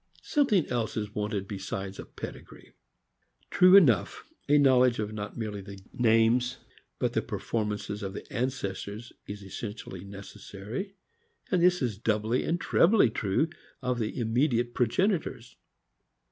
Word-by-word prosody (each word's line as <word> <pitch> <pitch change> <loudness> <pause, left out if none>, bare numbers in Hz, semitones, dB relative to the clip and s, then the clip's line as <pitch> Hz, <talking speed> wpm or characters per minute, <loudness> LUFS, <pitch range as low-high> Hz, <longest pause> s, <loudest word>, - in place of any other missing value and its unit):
Something 240 - +2
else 120 -3 -2
is 105 -1 -3
wanted 105 -2 -2
besides 95 0 -5
a - - -6
pedigree. - - -10 0.8
True 185 +1 +7
enough, 125 - +4 0.3
a 145 - +6
knowledge 130 -3 +5
of 105 0 -3
not 105 -1 -6
merely 105 -3 -4
the 100 0 -10
names, 120 +1 +3 0.4
but - - -1
the - - +1
performances 105 -1 -3
of 95 -1 -4
the - - -7
ancestors 115 -3 -3
is 100 0 -7
essentially 100 -2 -7
necessary, 100 - -8 0.6
and 180 -3 +3
this 180 -3 +4
is 110 -5 -2
doubly 110 +2 0
and 175 - 0
trebly 170 - +4
true 105 +8 0 0.4
of 125 -1 0
the 110 -2 -3
immediate 120 +1 +1
progenitors. 155 - 0
115 Hz, 130 wpm, -28 LUFS, 105-130 Hz, 0.8 s, True